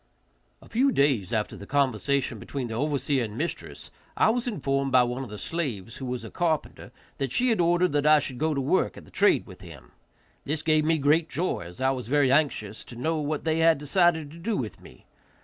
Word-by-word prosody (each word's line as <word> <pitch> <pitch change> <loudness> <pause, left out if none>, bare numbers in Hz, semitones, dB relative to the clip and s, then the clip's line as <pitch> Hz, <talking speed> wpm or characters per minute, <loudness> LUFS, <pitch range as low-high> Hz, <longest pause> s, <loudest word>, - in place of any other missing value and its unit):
A - - -15
few 265 +4 +2
days 135 - +1
after 110 -2 -1
the 100 - -10
conversation 140 -1 0
between 130 -4 -5
the - - -4
overseer 140 0 0
and 110 -1 -6
mistress, 170 +5 -5 0.3
I - - +4
was 245 +1 -2
informed 135 - -1
by 125 -1 +6
one 125 +2 -3
of 125 - -8
the 105 - -7
slaves, 115 - -4
who 130 - -6
was 125 -2 -4
a - - -9
carpenter, 165 -3 -2 0.3
that 135 -3 -2
she 250 - +2
had 225 -6 +2
ordered 175 +1 +3
that 145 0 +1
I 155 0 +7
should 130 -3 -5
go 155 -1 +1
to 140 - 0
work 145 +8 +1
at - - -11
the - - -18
trade 205 - +3
with 95 -5 -13
him. 85 -7 -13 0.5
This 150 +2 -3
gave 155 -1 +3
me 160 +1 +3
great 155 +3 +2
joy, 175 +6 -1
as 90 - -12
I 130 0 +2
was 125 -4 -4
very 140 0 +3
anxious 135 -8 0
to 120 - -10
know 155 +7 -1
what 150 0 -2
they 160 0 0
had 165 -1 +5
decided 160 0 +2
to 165 - -12
do 210 +5 -2
with 115 -5 -5
me. - - -16
145 Hz, 225 wpm, -26 LUFS, 125-160 Hz, 0.5 s, I